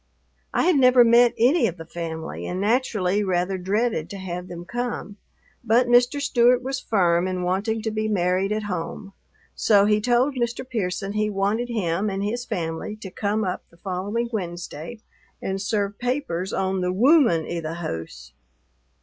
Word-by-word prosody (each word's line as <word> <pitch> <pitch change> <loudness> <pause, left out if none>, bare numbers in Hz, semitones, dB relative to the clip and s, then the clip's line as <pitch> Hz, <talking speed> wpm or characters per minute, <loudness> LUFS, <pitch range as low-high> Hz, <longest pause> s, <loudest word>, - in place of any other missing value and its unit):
I - - +1
had 350 -2 +4
never 255 -2 +6
met 235 +1 +5
any 250 +2 +4
of 180 -3 -5
the 165 - -9
family 160 -1 -6
and 180 - -3
naturally 210 -3 +1
rather 185 0 0
dreaded 200 -2 -1
to 200 - -7
have 180 -1 -5
them 175 -1 -8
come, 240 -2 -4 0.5
but 235 +2 +3
Mr. 245 +3 +4
Stewart 250 -3 +3
was 265 +1 -2
firm 180 -6 +2
in 185 -1 -2
wanting 205 +5 -1
to 220 - -1
be 215 0 -1
married 185 -1 +1
at 215 0 -1
home, 195 +1 -5 0.4
so 205 -2 +4
he 210 0 +3
told 245 +5 +2
Mr. 240 0 -3
Pearson 195 -4 -2
he 215 0 0
wanted 210 +4 -1
him 200 -3 -1
and 195 0 -3
his 240 +4 -2
family 165 +4 -4
to 205 -3 -9
come 210 +2 -1
up 185 -2 -2
the 170 - -22
following 200 +6 -3
Wednesday 175 0 -5 0.4
and 190 0 -3
serve 205 0 -1
papers 245 -8 -2
on 190 0 -1
the 180 0 0
"wooman 230 - +4
i' 175 - -3
the 160 0 -5
hoose." 80 - -6
205 Hz, 170 wpm, -24 LUFS, 180-235 Hz, 0.5 s, never